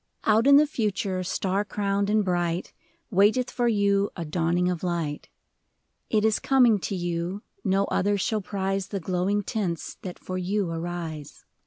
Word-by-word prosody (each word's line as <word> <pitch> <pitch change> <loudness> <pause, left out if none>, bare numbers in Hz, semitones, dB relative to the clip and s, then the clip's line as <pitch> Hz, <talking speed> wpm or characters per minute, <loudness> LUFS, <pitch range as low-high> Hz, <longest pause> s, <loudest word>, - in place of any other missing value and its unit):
Out 220 +4 +3
in 280 0 +8
the 300 - +6
Future, 205 -8 -1
star 190 +2 -1
crowned 200 -1 -1
and 210 -1 +2
bright, 175 -1 -1 0.4
Waiteth 215 +6 +3
for 245 -1 0
you 200 -2 +2
a 170 - -4
dawning 170 +3 +1
of 180 -2 -1
light. 170 -5 -3 0.8
It 215 -1 +2
is 220 -1 +2
coming 245 -6 +4
to 195 - -3
you, 175 +2 -3 0.2
no 195 0 +2
other 205 +1 +1
shall 215 +2 0
prize 195 -1 -2
The 200 - -3
glowing 185 +4 0
tints 185 -6 -3
that 180 -2 -7
for 185 0 -5
you 190 0 -1
arise. 165 -3 -6
195 Hz, 160 wpm, -26 LUFS, 175-210 Hz, 0.8 s, in